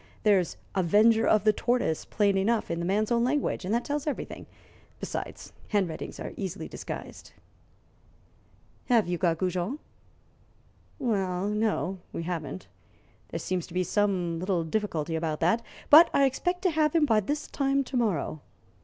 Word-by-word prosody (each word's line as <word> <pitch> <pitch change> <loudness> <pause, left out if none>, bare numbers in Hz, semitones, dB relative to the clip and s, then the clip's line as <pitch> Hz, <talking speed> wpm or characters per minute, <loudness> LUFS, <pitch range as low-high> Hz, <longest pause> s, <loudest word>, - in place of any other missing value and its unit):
There's 195 -5 +3 0.2
'avenger 215 +5 +4
of 215 -2 +4
the 215 0 +4
tortoise' 240 -9 0
plain 200 -2 +1
enough, 210 +1 +1
in 170 - -2
the 170 - -2
man's 210 +4 +1
own 235 0 +3
language, 265 -4 0
and 185 - -3
that 240 - -1
tells 290 +1 -2
everything. 295 - -4 0.5
Besides, - - -6
handwritings 190 -6 -2
are - - -6
easily 190 -4 -5
disguised." - - -8 1.5
"Have 235 -6 +3
you 175 -1 -2
got 170 -3 +2
Goujon?" 185 - -1 1.2
"Well, 195 - -1
no; 210 -3 -1
we 165 - -4
haven't. 165 -1 -4 0.6
There - - -4
seems 185 -2 -2
to 180 - -12
be 185 - +2
some 180 -3 0
little 180 -1 0
difficulty 165 -3 -2
about 160 -1 -2
that. 180 +8 +3 0.3
But 320 +3 +10
I 280 - +5
expect 355 +7 -1
to 365 - +3
have 305 0 +1
him 320 -2 +5
by 225 -6 +3
this 290 +9 -2
time 275 0 0
to 260 - -7
morrow. 185 - 0
205 Hz, 155 wpm, -28 LUFS, 180-240 Hz, 1.5 s, But